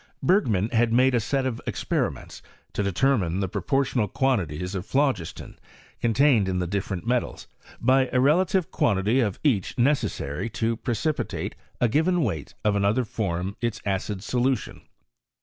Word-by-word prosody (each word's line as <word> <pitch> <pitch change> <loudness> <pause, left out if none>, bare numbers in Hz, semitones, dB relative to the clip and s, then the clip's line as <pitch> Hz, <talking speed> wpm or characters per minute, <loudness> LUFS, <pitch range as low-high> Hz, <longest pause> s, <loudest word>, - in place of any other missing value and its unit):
Btfgnum 115 - +2
had 115 0 +3
made 130 +3 +4
a 120 - +3
set 135 +4 -1
of 125 -3 -3
expenments - - -2 0.3
to - - -1
de 100 -1 0
tannine 95 -4 +1
die 100 - 0
proportional 110 +4 0
quantities 90 - -1
of 95 -2 -3
phlogiston 130 - -1 0.4
contained 120 -3 +3
in 95 - -1
the 90 - 0
di&nent 95 0 -3
metalsy 125 +1 -1 0.4
bj 130 +1 +4
the 125 - +2
relative 175 +6 +2
qnandty 110 +4 +2
of 100 -4 -2
each 115 -11 +1
neceaaarj 120 - 0
to 115 0 0
precipitate 130 +6 -2 0.3
a 120 - +3
gpiven 160 +7 +2
weight 80 - -3
of 105 -1 +3
another 100 +5 +2
finom 95 -4 -3
ita 115 -2 -1
acid 95 0 -2
aolntion. 125 +3 -1
115 Hz, 150 wpm, -25 LUFS, 100-130 Hz, 0.4 s, made